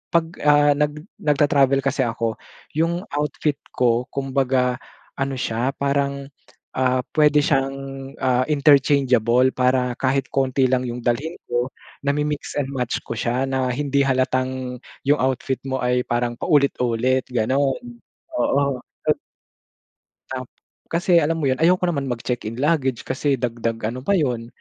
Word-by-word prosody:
'pag, 170 Hz, -1 st, +4 dB, 0.2 s
ah, 145 Hz, 0 st, +6 dB
nag 150 Hz, +1 st, 0 dB, 0.3 s
nagta-travel 140 Hz, -2 st, +3 dB
kasi 135 Hz, +1 st, 0 dB
ako, 115 Hz, -2 st, -1 dB, 0.4 s
yung 165 Hz, +3 st, 0 dB
outfit 150 Hz, 0 st, -1 dB, 0.2 s
ko 120 Hz, 0 st, +2 dB
kumbaga 130 Hz, -2 st, 0 dB, 0.4 s
ano 135 Hz, 0 st, -1 dB
siya, 120 Hz, +3 st, -1 dB
parang, 140 Hz, 0 st, 0 dB, 0.5 s
ah, 130 Hz, 0 st, +2 dB, 0.2 s
puwede 150 Hz, -1 st, +5 dB
siyang, 135 Hz, -1 st, +1 dB, 0.5 s
ah, 130 Hz, -1 st, +3 dB
interchangeable. 135 Hz, -4 st, +4 dB
Para 125 Hz, 0 st, +2 dB
kahit 135 Hz, 0 st, +1 dB
konti 135 Hz, -1 st, +2 dB
lang 130 Hz, -1 st, +2 dB
yung 120 Hz, 0 st, -4 dB
dalhin 140 Hz, +8 st, -1 dB
ko, 120 Hz, +1 st, 0 dB, 0.4 s
nami-mix 150 Hz, +1 st, -1 dB
and 140 Hz, -, -1 dB
match 125 Hz, -3 st, -1 dB
ko -, -, -7 dB
siya 120 Hz, +3 st, 0 dB
na 130 Hz, -1 st, 0 dB
hindi 140 Hz, +1 st, +1 dB
halatang 130 Hz, -1 st, -1 dB, 0.3 s
yung 145 Hz, +1 st, +4 dB
outfit 130 Hz, 0 st, -1 dB
mo 130 Hz, 0 st, -1 dB
ay 125 Hz, 0 st, +2 dB
parang 120 Hz, 0 st, 0 dB
paulit-ulit, 130 Hz, -4 st, +2 dB
ganun. 130 Hz, -, +1 dB, 0.6 s
Oo, 140 Hz, -2 st, +1 dB, 0.3 s
at -, -, +3 dB, 1.1 s
Tap 130 Hz, -1 st, -5 dB, 0.4 s
kasi 175 Hz, +1 st, +3 dB
alam 165 Hz, +1 st, 0 dB
mo -, -, +2 dB
'yon, 130 Hz, -, -1 dB
ayoko 180 Hz, +3 st, +3 dB
naman 140 Hz, -5 st, -1 dB
mag-check 120 Hz, 0 st, -3 dB
in 110 Hz, -, -5 dB
luggage 135 Hz, -6 st, +1 dB
kasi 135 Hz, +2 st, 0 dB
dagdag 115 Hz, -2 st, -2 dB
ano 120 Hz, +3 st, -4 dB
pa 200 Hz, -, +2 dB
'yon, 125 Hz, -9 st, 0 dB
135 Hz, 140 wpm, -22 LUFS, 125-145 Hz, 1.1 s, ah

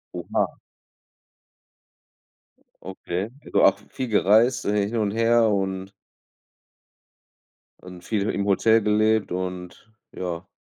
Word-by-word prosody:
Oha. -, -, -2 dB, 2.3 s
Okay. 95 Hz, +1 st, -5 dB, 0.2 s
Also -, -, +1 dB
auch -, -, +5 dB
v -, -, -22 dB
viel 130 Hz, -2 st, -5 dB
gereist, 110 Hz, +4 st, +3 dB
äh, 100 Hz, -1 st, +1 dB
hin 115 Hz, -, -4 dB
und 105 Hz, -2 st, 0 dB
her 115 Hz, +1 st, +3 dB
und 95 Hz, -1 st, -2 dB, 1.9 s
und 90 Hz, -1 st, -12 dB
viel 105 Hz, -3 st, -1 dB
he -, -, 0 dB
im 100 Hz, -, -2 dB
Hotel 110 Hz, +3 st, +3 dB
gelebt 110 Hz, 0 st, +1 dB
und 90 Hz, +3 st, -6 dB, 0.2 s
ja. 90 Hz, 0 st, -5 dB
100 Hz, 115 wpm, -24 LUFS, 95-110 Hz, 2.3 s, auch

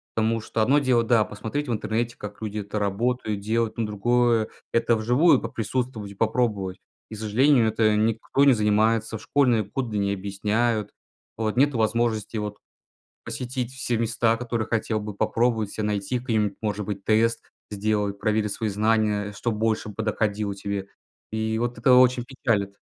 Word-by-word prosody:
Потому 115 Hz, +1 st, +1 dB
что 110 Hz, 0 st, -1 dB
одно 140 Hz, +6 st, +4 dB
дело, 130 Hz, -4 st, +2 dB
да, 115 Hz, -1 st, +3 dB
посмотреть 115 Hz, +8 st, -4 dB
в -, -, -2 dB
интернете, 115 Hz, +2 st, -2 dB
как 105 Hz, 0 st, -9 dB
люди 105 Hz, -1 st, -4 dB
это 105 Hz, +1 st, -4 dB
работают, 105 Hz, +1 st, -1 dB
делают, 110 Hz, +2 st, -1 dB
но 115 Hz, -, 0 dB
другое- 115 Hz, +2 st, +2 dB, 0.3 s
это 115 Hz, 0 st, +3 dB
вживую 125 Hz, +10 st, +4 dB
поприсутствовать 115 Hz, -2 st, -3 dB
и -, -, -12 dB
попробовать. 105 Hz, -4 st, 0 dB, 0.3 s
И -, -, -5 dB
к -, -, -9 dB
сожалению, 115 Hz, +3 st, +3 dB
это 110 Hz, -1 st, +2 dB
никто 110 Hz, +5 st, +1 dB
не 140 Hz, -1 st, +7 dB
занимается, 110 Hz, +1 st, +2 dB
в -, -, -13 dB
школьные 125 Hz, -6 st, +2 dB
годы 110 Hz, +1 st, -3 dB
не 100 Hz, 0 st, 0 dB
объясняют. 105 Hz, +3 st, -1 dB, 0.5 s
Вот. 110 Hz, -1 st, -1 dB
Нету 140 Hz, 0 st, +3 dB
возможности 115 Hz, 0 st, 0 dB
вот 105 Hz, -1 st, -4 dB, 0.7 s
посетить 125 Hz, 0 st, -4 dB
все 125 Hz, -2 st, -2 dB
места, 115 Hz, 0 st, +1 dB
которые 115 Hz, -2 st, -3 dB
хотел 110 Hz, -1 st, -1 dB
бы 105 Hz, -1 st, -6 dB
попробовать 115 Hz, 0 st, 0 dB
ся, 110 Hz, -, -4 dB
найти 105 Hz, +3 st, -1 dB
к 130 Hz, -, -16 dB
ним, 105 Hz, -3 st, +1 dB
может 105 Hz, -1 st, -2 dB
быть, 100 Hz, -1 st, -5 dB
тест, 115 Hz, +1 st, +2 dB, 0.3 s
сделать, 105 Hz, -1 st, -1 dB
проверить 105 Hz, -1 st, 0 dB
свои 110 Hz, +1 st, -2 dB
знания, 105 Hz, 0 st, +1 dB
что 110 Hz, +4 st, -2 dB
больше 110 Hz, 0 st, -1 dB
подоходило 105 Hz, -1 st, -1 dB
тебе. 100 Hz, 0 st, -4 dB, 0.4 s
И 110 Hz, 0 st, -1 dB
вот 120 Hz, 0 st, -2 dB
это 125 Hz, +2 st, +5 dB
очень 125 Hz, -1 st, +5 dB
печалит. 110 Hz, -6 st, -1 dB
110 Hz, 165 wpm, -25 LUFS, 105-120 Hz, 0.7 s, не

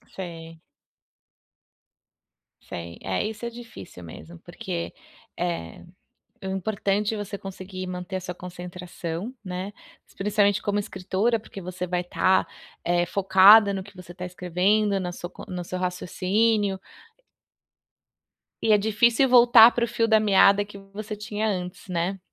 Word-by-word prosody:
Sei. 165 Hz, -3 st, -8 dB, 2.0 s
Sei. 85 Hz, 0 st, -8 dB
É, 95 Hz, -1 st, -2 dB
isso 220 Hz, +2 st, -5 dB
é -, -, -2 dB
difícil 225 Hz, -, -11 dB
mesmo 165 Hz, -, -11 dB
porque, 175 Hz, -1 st, -6 dB, 0.4 s
eh, 170 Hz, -, -4 dB, 0.6 s
o -, -, -6 dB
importante 200 Hz, +2 st, -1 dB
é -, -, -5 dB
você 205 Hz, 0 st, -5 dB
conseguir 185 Hz, -1 st, -8 dB
manter 180 Hz, +1 st, -5 dB
a 185 Hz, -, -3 dB
sua 180 Hz, 0 st, -6 dB
concentração, 180 Hz, +3 st, -7 dB
né, 185 Hz, +2 st, -5 dB, 0.4 s
principalmente 205 Hz, 0 st, +1 dB
como 205 Hz, 0 st, 0 dB
escritora, 205 Hz, +4 st, -1 dB
porque 210 Hz, -2 st, -11 dB
você 180 Hz, 0 st, -5 dB
vai 180 Hz, 0 st, -1 dB
estar, 180 Hz, +1 st, +2 dB, 0.4 s
eh, 175 Hz, 0 st, +1 dB
focada 200 Hz, +3 st, +6 dB
no 190 Hz, -, -3 dB
que 200 Hz, +1 st, -15 dB
você 180 Hz, -1 st, -11 dB
está 180 Hz, +1 st, -8 dB
escrevendo, 185 Hz, +3 st, +1 dB
na 180 Hz, -1 st, -4 dB
sua 175 Hz, -, -7 dB
co -, -, -11 dB
no 180 Hz, -1 st, -4 dB
seu 185 Hz, +2 st, -5 dB
raciocínio. 190 Hz, +3 st, 0 dB, 1.8 s
E 220 Hz, -, +2 dB
é 210 Hz, -, +7 dB
difícil 230 Hz, +5 st, +3 dB
voltar 240 Hz, -2 st, +8 dB
para 240 Hz, -1 st, 0 dB
o -, -, -8 dB
fio 230 Hz, 0 st, 0 dB
da 220 Hz, -1 st, +5 dB
meada 200 Hz, -1 st, +5 dB
que 200 Hz, 0 st, -12 dB
você 200 Hz, +2 st, -8 dB
tinha 210 Hz, +1 st, -3 dB
antes, 180 Hz, -2 st, -4 dB
né. 180 Hz, +2 st, -2 dB
190 Hz, 140 wpm, -25 LUFS, 180-210 Hz, 2.0 s, voltar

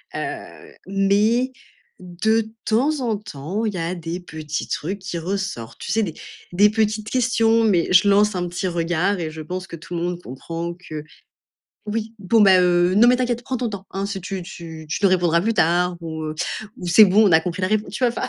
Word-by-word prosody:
Heu, -, -, -6 dB
mais, 205 Hz, +6 st, +2 dB, 0.5 s
de 215 Hz, +5 st, 0 dB, 0.2 s
temps 275 Hz, +7 st, +1 dB
en 225 Hz, -4 st, 0 dB
temps, 195 Hz, +3 st, -5 dB
il 210 Hz, -, -1 dB
y -, -, -4 dB
a 170 Hz, +2 st, -2 dB
des 170 Hz, +1 st, -5 dB
petits 155 Hz, -3 st, -5 dB
trucs 195 Hz, +6 st, -3 dB
qui 185 Hz, -2 st, -5 dB
ressortent. 190 Hz, -, -4 dB
Tu -, -, -5 dB
sais, 225 Hz, -, +2 dB
des 170 Hz, -6 st, -3 dB, 0.4 s
des 205 Hz, +4 st, +5 dB
petites 215 Hz, -1 st, -1 dB
questions, 230 Hz, -2 st, +2 dB
mais 185 Hz, -7 st, +2 dB
je 185 Hz, +3 st, +6 dB
lance 205 Hz, 0 st, +4 dB
un 175 Hz, -1 st, -1 dB
petit 180 Hz, +2 st, -3 dB
regard 175 Hz, +3 st, 0 dB
et 160 Hz, -2 st, -3 dB
je 160 Hz, 0 st, -8 dB
pense 185 Hz, +4 st, -5 dB
que -, -, -8 dB
tout 175 Hz, +2 st, -8 dB
le 170 Hz, -, -2 dB
monde 175 Hz, 0 st, -3 dB
comprend 165 Hz, +6 st, -6 dB
que, 155 Hz, -4 st, -8 dB, 0.8 s
«Oui, 225 Hz, +1 st, -3 dB
bon, 205 Hz, +3 st, +2 dB
bah, 190 Hz, -2 st, +6 dB
heu, 175 Hz, 0 st, +3 dB
non 235 Hz, +3 st, +7 dB
mais 250 Hz, -, +6 dB
t'inquiète, 245 Hz, -1 st, -1 dB
prends 260 Hz, -1 st, -2 dB
ton 240 Hz, -1 st, -2 dB
temps, 195 Hz, -1 st, -7 dB
hein, 195 Hz, +1 st, -2 dB
si 195 Hz, -1 st, -4 dB
tu 185 Hz, +1 st, -5 dB
tu 160 Hz, -2 st, -9 dB
tu 155 Hz, -, -2 dB
nous -, -, +7 dB
répondras 175 Hz, -2 st, +3 dB
plus 225 Hz, +5 st, 0 dB
tard» 175 Hz, 0 st, +2 dB
ou, 160 Hz, -1 st, -6 dB
heu, 155 Hz, 0 st, -4 dB, 0.4 s
ou 180 Hz, -, -7 dB
«C'est 210 Hz, +5 st, +8 dB
bon, 205 Hz, +3 st, +5 dB
on 180 Hz, -, +2 dB
a 160 Hz, -, +8 dB
compris 180 Hz, +2 st, -4 dB
la 185 Hz, -, +1 dB
répon» 215 Hz, 0 st, 0 dB
tu 210 Hz, -, -6 dB
vois? -, -, +5 dB
Enfin. -, -, -3 dB
185 Hz, 220 wpm, -22 LUFS, 170-215 Hz, 0.8 s, C'est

